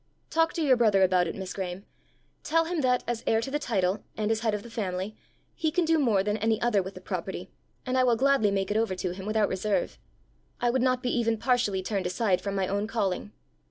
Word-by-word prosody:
Talk 325 0 +3
to 330 - -1
your 265 -4 +4
brother 210 -5 +4
about 180 -1 +3
it, - - -4
Miss 190 -1 -5
Graeme. 190 0 -5 0.6
Tell 330 +2 +2
him 335 -1 -1
that, 250 -2 +2
as 235 -1 -2
heir 225 - +3
to 230 +4 -4
the 295 - 0
title, 195 -7 0
and 215 0 0
as 220 - +1
head 220 -2 0
of 205 - -5
the 235 - -10
family, 195 -1 -3 0.4
he 320 -2 0
can 345 +2 +1
do 325 0 +3
more 220 -9 +3
than 210 +1 0
any 220 +1 +1
other 235 -4 +2
with 190 +1 -7
the - - -9
property, - - -5 0.3
and 255 0 -1
I 255 - +4
will 245 -2 +4
gladly 270 -3 +3
make 195 0 -1
it 210 - +1
over 220 -4 0
to 185 -1 -3
him 190 +2 -8
without 215 -1 +2
reserve. 195 +2 -1 0.6
I 240 - +2
would 260 0 +1
not 255 0 +1
be 245 - 0
even 230 -2 +1
partially 235 -6 +1
turned 195 -2 -1
aside 185 0 +1
from 200 -1 -3
my 190 -1 0
own 200 +2 -1
calling." 210 -3 -2
220 Hz, 240 wpm, -27 LUFS, 195-250 Hz, 0.6 s, your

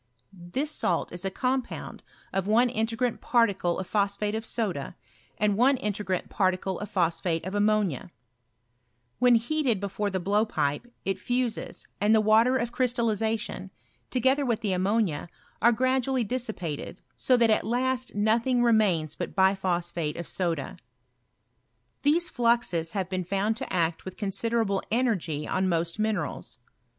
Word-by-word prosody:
TfaiB 180 - -3
salt 180 - -1
is 175 +1 -5
a - - +1
compound 255 +5 -3 0.3
of 195 0 -1
one 235 +4 +4
integ^ni 225 +1 -1
particle 200 -8 +2
of 190 - -3
phoa 205 -2 +2
phateof 210 +1 -1
aoda, 210 - -2 0.4
and 210 -1 +2
one 260 +5 +4
integrant 205 -4 -2
particle 185 -1 0
of 210 - -6
phosphate 170 -2 0
of 190 - -4
ammonia 205 -8 +1 1.1
When 245 -1 +6
heated 240 -1 +1
before 200 +1 -2
the 190 -1 -2
blowpipe 205 0 0
it 195 -1 -1
fuses, 245 +2 -2
and 210 +2 +4
the - - +5
water 220 +4 +4
of 235 -1 -2
crystallization, 230 -3 -1 0.4
together 265 +3 +2
with 235 -4 0
the 205 -4 0
ammonia, 185 -4 0 0.3
are 235 - +6
gradually 260 +1 +1
dissipated, 220 - -4
so 255 - +3
that 230 -2 +4
at 215 - +2
last 250 +1 -1
nothing 230 +4 +2
remains 195 -10 +2
but - - -6
biphosphate 175 -5 +1
of 170 - -5
soda. 165 -7 -2 1.2
These 315 +5 +3
fluxes 235 - +1
have 190 -2 -1
been 185 -1 -2
found 195 +5 0
to - - -5
act 170 -2 0
with 185 - -8
consideraUe 205 0 0
energy 185 - 0
on 185 0 0
most 170 +2 0
minerals. 215 -1 -2
210 Hz, 140 wpm, -27 LUFS, 185-240 Hz, 1.2 s, When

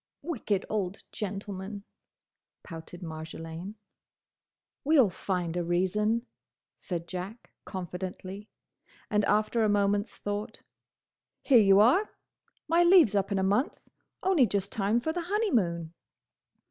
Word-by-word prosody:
"Wicked 220 - -1
old 200 -3 -3
gentleman!" 200 0 -5 0.8
pouted 170 +1 -9
Marjolaine. 165 +4 -7 1.1
"We'll 280 -9 +5
find 180 -2 -2
a 175 - 0
reason," 210 +7 +1 0.5
said 170 -2 -5
Jack, 185 +6 -7
confidently; 185 +2 -6 0.6
and 210 -1 +3
after 215 +3 +2
a 215 - +3
moment's 205 +1 +1
thought: 205 +1 -4 0.8
"Here 255 -4 +6
you 195 -1 +6
are! 270 - +5 0.6
My 335 +2 +4
leave 345 - +7
's - - -4
up 200 0 +1
in 200 - +1
a 190 - +1
month: 205 - +1 0.4
only 355 -10 +4
just 200 0 -2
time 210 +2 +1
for 315 +6 -2
the 350 - -2
honeymoon!" 210 - 0
200 Hz, 120 wpm, -29 LUFS, 185-225 Hz, 1.1 s, leave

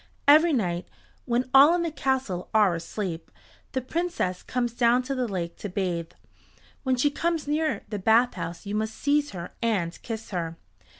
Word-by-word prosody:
Every 310 +4 +7
night, 180 - -1 0.4
when 245 +1 0
all 285 +5 +8
in 350 - 0
the 335 - -2
castle 265 - -1
are 210 -4 +5
asleep, 170 +1 -4 0.4
the 260 - 0
Princess 315 - -2
comes 240 -2 -2
down 240 +1 +3
to 275 - -3
the 255 -2 -1
lake 175 -5 -4
to 205 - -5
bathe. 175 -3 -2 0.7
When 260 -2 +1
she 285 +4 +2
comes 330 0 -1
near 305 +1 0
the 210 - -4
bathhouse 190 -6 +1
you 200 - -4
must 220 +1 -2
seize 290 0 +1
her 175 -2 -7
and 195 -8 -1
kiss 225 -2 -6
her. 165 -3 -3
230 Hz, 170 wpm, -26 LUFS, 180-275 Hz, 0.7 s, all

